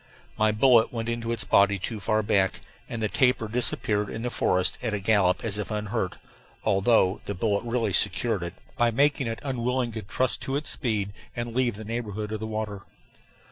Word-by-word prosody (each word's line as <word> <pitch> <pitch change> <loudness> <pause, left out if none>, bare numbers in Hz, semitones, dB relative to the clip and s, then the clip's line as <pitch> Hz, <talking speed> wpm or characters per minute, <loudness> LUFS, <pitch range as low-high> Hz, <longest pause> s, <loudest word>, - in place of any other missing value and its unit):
My 110 0 +3
bullet 115 +1 +4
went 115 -1 -3
into 115 0 -2
its 115 - 0
body 100 0 +4
too 105 +3 -4
far 110 +2 +1
back, 95 -3 +1 0.3
and 115 -2 -4
the - - +3
tapir 125 -1 +2
disappeared 105 -3 +1
in 115 - -5
the 125 - -2
forest 90 -4 +1
at 110 -4 -1
a - - -2
gallop 95 -3 +2
as 105 -2 -2
if 105 - -4
unhurt, 105 -2 -2 0.5
although 100 -1 +3
the 100 - -4
bullet 100 +1 0
really 115 -4 0
secured 105 +3 +2
it, 85 +1 -5 0.2
by 120 -2 +3
making 140 +2 +2
it 115 0 -3
unwilling 125 -2 -1
to 110 0 -5
trust 120 +5 -1
to 135 - -3
its 150 +1 -2
speed 105 -6 -1 0.2
and 120 -1 -4
leave 125 -4 +1
the 110 +1 -8
neighborhood 110 -2 -4
of 110 - -3
the 110 - -4
water. 110 -2 -4
110 Hz, 195 wpm, -26 LUFS, 100-120 Hz, 0.5 s, bullet